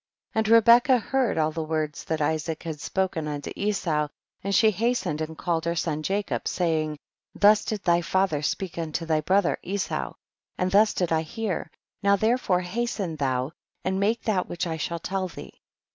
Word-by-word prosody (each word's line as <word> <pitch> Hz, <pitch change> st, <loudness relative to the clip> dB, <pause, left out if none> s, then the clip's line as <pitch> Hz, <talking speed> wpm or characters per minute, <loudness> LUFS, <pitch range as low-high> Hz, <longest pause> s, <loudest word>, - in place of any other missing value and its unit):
4. -, -, +1 dB
And 220 Hz, -, +1 dB
Rebecca 235 Hz, +3 st, +6 dB
heard 255 Hz, -1 st, 0 dB
all 155 Hz, 0 st, +2 dB
the 160 Hz, -, -3 dB
words 155 Hz, -1 st, -3 dB
that 160 Hz, -2 st, -1 dB
Isaac 160 Hz, +1 st, -1 dB
had 160 Hz, -4 st, -5 dB
spoken 185 Hz, -5 st, -1 dB
unto 145 Hz, -1 st, -4 dB
Esau, 175 Hz, -7 st, 0 dB, 0.4 s
and 200 Hz, +1 st, 0 dB
she 220 Hz, -1 st, +5 dB
hastened 210 Hz, -7 st, -1 dB
and 160 Hz, 0 st, -4 dB
called 165 Hz, -2 st, -1 dB
her 170 Hz, 0 st, 0 dB
son 155 Hz, -2 st, -1 dB
Jacob, 195 Hz, +5 st, -2 dB
saying, 155 Hz, -4 st, 0 dB, 0.4 s
thus 210 Hz, +1 st, +5 dB
did 210 Hz, -3 st, -3 dB
thy 170 Hz, 0 st, +3 dB
father 190 Hz, -3 st, +1 dB
speak 170 Hz, +3 st, -2 dB
unto 165 Hz, 0 st, -3 dB
thy 160 Hz, -1 st, +1 dB
brother 185 Hz, +3 st, +2 dB
Esau, 195 Hz, +1 st, -3 dB, 0.4 s
and 180 Hz, 0 st, 0 dB
thus 210 Hz, +2 st, +4 dB
did 180 Hz, -3 st, 0 dB
I 160 Hz, -1 st, +3 dB
hear, 190 Hz, +4 st, -3 dB, 0.3 s
now 200 Hz, -1 st, +4 dB
therefore 220 Hz, -3 st, +1 dB
hasten 195 Hz, -3 st, -3 dB
thou 130 Hz, -1 st, 0 dB, 0.3 s
and 190 Hz, 0 st, 0 dB
make 220 Hz, +4 st, +1 dB
that 195 Hz, -5 st, 0 dB
which 175 Hz, -, -2 dB
I 165 Hz, -2 st, -3 dB
shall 170 Hz, +2 st, -2 dB
tell 190 Hz, +2 st, -2 dB
thee. 175 Hz, -, -11 dB
180 Hz, 180 wpm, -26 LUFS, 160-205 Hz, 0.4 s, Rebecca